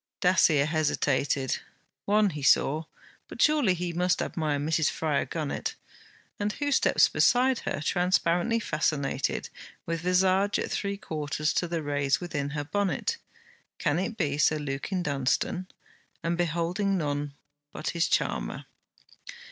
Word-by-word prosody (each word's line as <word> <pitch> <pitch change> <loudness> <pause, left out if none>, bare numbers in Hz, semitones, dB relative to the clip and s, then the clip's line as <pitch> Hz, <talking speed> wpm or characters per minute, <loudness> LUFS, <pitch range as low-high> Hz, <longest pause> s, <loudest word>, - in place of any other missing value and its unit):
Dacier 165 -5 +4
hesitated. 145 -3 0 0.5
One 210 -1 +3
he 150 -2 -6
saw. 150 +3 +3 0.4
But - - -11
surely 295 -12 +4
he 175 0 -3
must 180 +1 +1
admire 155 -3 -1
Mrs. 155 +2 +1
Fryar 155 -3 -1
Gunnett? 155 -4 -3 0.6
And 210 +1 -1
who 290 0 -2
steps - - +4
beside 255 0 +3
her, - - -3
transparently 180 +5 +1
fascinated, 150 -7 -1 0.4
with 165 -1 -3
visage 185 +3 +2
at - - -3
three 200 0 -2
quarters 150 -3 -2
to 175 - 0
the 165 -2 -3
rays 145 -1 +1
within 145 -5 -3
her 145 - -1
bonnet? 195 +4 -1 0.6
Can 145 - 0
it 225 +4 -3
be 145 -6 -1
Sir 155 0 +4
Lukin 150 +6 -3
Dunstane? 145 +5 -1 0.6
and 170 +1 0
beholding 175 +4 0
none 145 -3 -2 0.4
but - - -4
his 170 -1 +1
charmer! - - -1
165 Hz, 130 wpm, -27 LUFS, 145-185 Hz, 0.6 s, Dacier